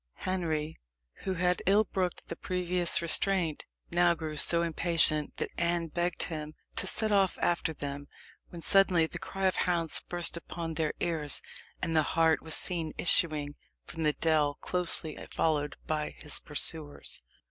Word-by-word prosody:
Henry, 160 -4 -2 0.5
who 190 - -1
had 180 +1 +1
ill 205 +3 +5
brooked 185 -3 -3
the 170 - -5
previous 180 -1 +2
restraint, 170 -1 +2 0.3
now 175 0 +4
grew 155 -1 -5
so 170 +2 +4
impatient, 165 -2 +2
that - - -3
Anne 170 -1 0
begged 175 +3 -1
him 155 -2 -5 0.2
to - - +4
set 220 -1 +1
off 195 -2 +3
after 170 -1 0
them, 145 -1 -6 0.4
when 170 -2 -9
suddenly 185 -4 +4
the - - -7
cry 195 0 -4
of 185 - +2
hounds 170 -3 0
burst 175 -1 0
upon 170 -1 -5
their 155 0 -1
ears, 160 -5 0 0.4
and 165 - 0
the 155 - +5 0.2
hart 160 -1 +4
was 160 - -1
seen 165 -4 -1
issuing 155 -4 +2 0.3
from 165 - -7
the 150 -1 +2
dell, 150 -3 +1
closely 170 -3 -1
followed 150 -2 0
by 155 -1 -2
his 150 - -3
pursuers. 150 0 -1
165 Hz, 155 wpm, -30 LUFS, 155-175 Hz, 0.5 s, ill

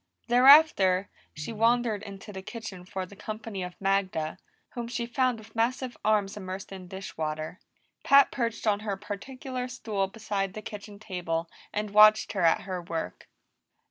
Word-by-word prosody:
Thereafter, 245 -8 +6 0.2
she 150 +9 -5
wandered 230 -1 +2
into 200 0 -9
the 190 - -6
kitchen 195 -4 -8
for 190 0 -4
the 200 - -14
company 215 -1 -6
of 180 0 -7
Magda, 195 -5 0 0.3
whom 240 -1 -5
she 235 0 -3
found 250 0 +1
with 220 +1 -15
massive 245 +2 0
arms 210 -2 +2
immersed 190 -1 -7
in 190 -2 -8
dish 190 +2 -8
water. 155 +3 -3 0.4
Pat 280 -1 +6
perched 230 -3 -2
on 205 -2 +2
her 205 -2 -3
particular 250 +5 -5
stool 215 -6 -2
beside 200 -2 -3
the 215 - -6
kitchen 205 0 -8
table 175 -5 -3 0.2
and 210 0 -3
watched 215 +1 +7
her 195 - -2
at 165 -1 +4
her 185 -2 -4
work. 165 - -5
205 Hz, 160 wpm, -28 LUFS, 190-230 Hz, 0.4 s, watched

